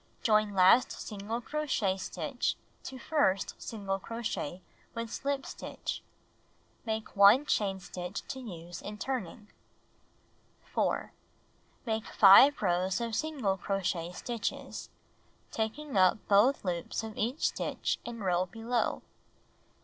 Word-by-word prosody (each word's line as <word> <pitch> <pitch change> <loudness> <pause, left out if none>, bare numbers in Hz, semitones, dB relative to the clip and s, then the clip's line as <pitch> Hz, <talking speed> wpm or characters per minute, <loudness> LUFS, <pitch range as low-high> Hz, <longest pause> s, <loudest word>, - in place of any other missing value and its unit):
Join 215 -2 +3
last 190 +7 +6
single 215 +3 -5
crochet 265 -9 0
stitch 190 - -2 0.3
to 265 - -6
first 255 -8 +1
single 195 -3 -3
crochet 195 -6 -4 0.3
with 230 -1 -4
slip 280 0 -2
stitch. - - -5 0.9
Make 220 0 -3
1 200 +8 +7
chain 195 -7 0
stitch 180 +1 -6
to 265 - -4
use 175 -7 -8
in 210 +1 -7
turning. 215 -4 -4 1.2
4. - - 0 0.7
Make 220 -1 -2
5 220 +7 +7
rows 185 +1 +1
of 230 -1 -3
single 255 -9 -1
crochet 180 -3 -2
stitches, 230 +5 -4 0.6
tak 220 +3 -2
ing 300 -5 -7
up 185 +2 +5
both 210 +7 +4
loop3 180 +3 -2
of 220 -1 -7
each 245 +8 0
stitch - - -2
in 235 -2 -7
row 185 -1 +1
below. 225 +5 -1
215 Hz, 120 wpm, -31 LUFS, 190-240 Hz, 1.2 s, 1